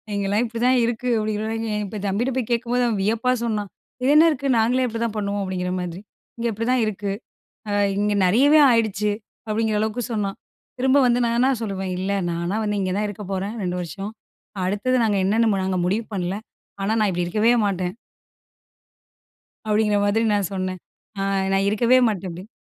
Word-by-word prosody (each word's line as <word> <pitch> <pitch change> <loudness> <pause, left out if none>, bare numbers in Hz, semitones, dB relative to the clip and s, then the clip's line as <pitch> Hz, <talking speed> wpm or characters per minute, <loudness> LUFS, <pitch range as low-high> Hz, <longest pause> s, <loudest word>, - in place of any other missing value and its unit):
இங்கலாம் 200 +3 +1
இப்டிதான் 245 +2 +2
இருக்கு, 240 +1 -2
அப்டிங்குற 215 -1 -2
தம்பிக்கிட்ட 235 +7 0
போய் 245 -2 -2
கேக்கும்போது 240 +1 +1
அவன் 215 -4 -1
வியப்பா 230 +4 +1
சொன்னான், 210 -3 -2 0.3
இது 270 - +4
என்ன 315 +2 +8
இருக்குது 275 -2 0
நாங்களே 250 +3 +2
இப்டிதான் 230 -1 -3
பண்ணுவோம், 200 0 -1
அப்டிங்குற 180 -1 -3
மாதிரி. 180 +1 -6 0.3
அ, - - -
இங்க 235 - 0
இப்டிதான் 235 +3 +1
இருக்கு 205 -1 -3 0.6
அ - - -1 0.3
இங்க 205 0 +1
நெறயவே 280 +11 +5
ஆயிடுச்சு 210 -3 +1 0.4
அப்டிங்குற 215 0 0
அளவுக்கு 220 +3 -1
சொன்னான், 200 -3 -2 0.4
திரும்ப 265 +2 +3
வந்து 245 0 +2
நான் 235 0 +1
என்ன 255 - +4
சொல்லுவேன், 195 -3 -3
இல்ல 190 +2 -1 0.2
நானா 170 +4 -2
வந்து 210 -1 -1
இங்க 185 -1 -1
தான் 210 - 0
இருக்கப் 205 -1 -7
போறேன் 195 +4 -3
2 180 -1 -2
வருஷம். 195 +4 -5 0.5
அடுத்தது 205 +7 0
நாங்க 210 -3 +1
என்னென்னு 225 +4 +3 0.2
நாங்க 190 -1 0
முடிவு 205 +5 0
பண்ணல. 185 0 -2 0.5
ஆனா 200 +3 0
நான் 210 -2 +3
இப்டி 175 0 -1
இருக்கவே 215 +6 +3
மாட்டேன். 185 -2 -2 1.7
அப்டிங்குற 210 -1 +2
மாதிரி 215 +3 +2
நான் 200 -3 0
சொன்னேன், 185 -1 -3 0.4
அ - - -1 0.3
நான் 195 +1 +2
இருக்கவே 235 +4 +4
மாட்டேன் 190 -3 -3
அப்டி. 180 +4 -9
210 Hz, 165 wpm, -23 LUFS, 195-230 Hz, 1.7 s, என்ன